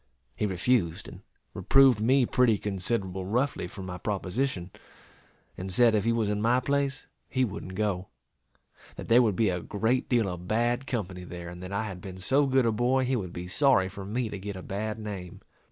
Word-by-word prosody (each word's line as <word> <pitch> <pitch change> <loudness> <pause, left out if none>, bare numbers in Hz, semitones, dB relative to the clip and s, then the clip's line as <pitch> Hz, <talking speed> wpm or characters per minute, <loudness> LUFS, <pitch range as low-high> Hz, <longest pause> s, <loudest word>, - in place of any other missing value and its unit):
He 105 - 0
refused, 95 -2 0
and - - -11 0.3
reproved 135 -5 +5
me 130 +3 +4
pretty 120 -3 +3
considerable 95 -1 -2
roughly 125 -2 0
for 95 +2 -9
my 90 -1 -6
proposition; 100 -1 -2 0.8
and 95 +1 -6
said, 115 +4 +5
if 105 -1 +1
he 115 - +3
was 115 -2 +1
in 105 0 -1
my 120 +3 +3
place 140 +1 -1 0.2
he 130 -1 +1
wouldn't 95 -3 -7
go; 95 -3 -1 0.9
that - - -8
there 120 +2 +7
would 110 -5 +2
be 110 +1 +2
a 90 -1 -1
great 115 +7 0
deal 120 -5 +2
of 90 -1 -6
bad 120 +5 0
company 95 -7 -3
there; 85 -1 -8
and 90 0 -9
that 90 +1 -7
I 100 +2 -1
had 95 -4 -6
been 95 -1 -8
so 135 +10 +2
good 130 -1 +3
a 115 - +3
boy, 125 +4 +2
he 130 +1 +1
would 95 -7 -3
be 90 0 -6
sorry 120 -3 +3
for 95 +1 -8
me 115 +5 -2
to 100 - -6
get 100 +1 -6
a 95 - -8
bad 105 +2 -3
name. 100 -5 -7
105 Hz, 200 wpm, -28 LUFS, 95-125 Hz, 0.9 s, there